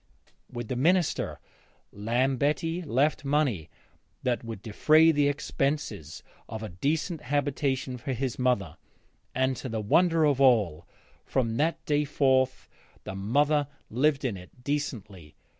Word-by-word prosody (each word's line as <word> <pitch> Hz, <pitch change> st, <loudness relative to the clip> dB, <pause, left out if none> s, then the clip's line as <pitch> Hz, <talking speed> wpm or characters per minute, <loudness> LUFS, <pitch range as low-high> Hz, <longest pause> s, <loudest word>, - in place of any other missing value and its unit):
With 120 Hz, -1 st, -5 dB
the 130 Hz, -, -3 dB
minister 170 Hz, +6 st, +1 dB, 0.5 s
Lambetti 135 Hz, -, 0 dB
left 145 Hz, 0 st, +1 dB
money 135 Hz, -, 0 dB, 0.5 s
that 125 Hz, -2 st, 0 dB
would 115 Hz, -4 st, -7 dB
defray 155 Hz, +9 st, +5 dB
the 145 Hz, -2 st, +2 dB
expenses 135 Hz, -, -2 dB, 0.3 s
of 110 Hz, 0 st, -6 dB
a 110 Hz, -, -5 dB
decent 150 Hz, -, -2 dB
habitation 135 Hz, -2 st, -1 dB
for 135 Hz, -, -4 dB
his 130 Hz, 0 st, -3 dB
mother, 125 Hz, -, 0 dB, 0.6 s
and, 130 Hz, +1 st, +1 dB
to 130 Hz, -, -6 dB
the 110 Hz, -1 st, -2 dB
wonder 165 Hz, -, +3 dB
of 140 Hz, -2 st, +2 dB
all, 105 Hz, -, +3 dB, 0.4 s
from 115 Hz, -4 st, -1 dB
that 160 Hz, +3 st, 0 dB
day 150 Hz, 0 st, +2 dB
forth 130 Hz, -2 st, +1 dB, 0.4 s
the -, -, -6 dB
mother 145 Hz, +9 st, +1 dB, 0.2 s
lived 140 Hz, +4 st, +2 dB
in 110 Hz, -7 st, -1 dB
it 90 Hz, +7 st, -15 dB
decently. 105 Hz, -, -4 dB
130 Hz, 130 wpm, -28 LUFS, 115-145 Hz, 0.6 s, defray